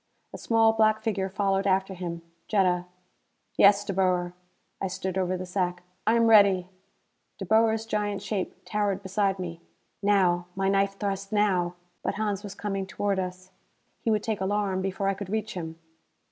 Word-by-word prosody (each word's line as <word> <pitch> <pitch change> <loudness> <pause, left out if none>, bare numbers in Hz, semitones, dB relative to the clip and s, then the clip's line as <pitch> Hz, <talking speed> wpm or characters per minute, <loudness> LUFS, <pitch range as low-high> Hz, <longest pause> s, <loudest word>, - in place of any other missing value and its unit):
A - - -5
small 225 -1 +3
black 220 0 +3
figure 195 -4 -1
followed 195 0 0
after 190 0 +1
him. 170 -2 -5 0.2
Jetta. 180 -4 +2 0.7
"Yes, 200 +1 +5
De 200 - -2
Boer." 180 -2 +1 0.5
I 195 - 0
stood 190 0 -4
over 185 -1 0
the 185 - -5
sack. 180 -1 -2 0.2
"I 225 - +5
am 230 0 +4
ready." 200 -5 +5 0.7
De - - -5
Boer's 220 0 +3
giant 210 -2 -2
shape 200 -4 -3
towered 205 -2 -1
beside 195 0 0
me. 170 -2 -6 0.4
Now! 185 -4 +2
My 195 0 +1
knife 195 0 +1
thrust 195 -1 -3
now! 185 -5 +1 0.3
But - - -2
Hans 205 -2 -1
was 205 -2 -8
coming 195 -2 -3
toward 195 0 -1
us. 185 0 -5 0.5
He - - -2
would 215 -2 +1
take 215 -3 -2
alarm 195 -1 0
before 195 +1 -2
I 195 - +2
could 195 -1 -7
reach 215 +1 -2
him. 165 -3 -6
195 Hz, 170 wpm, -27 LUFS, 185-210 Hz, 0.7 s, Yes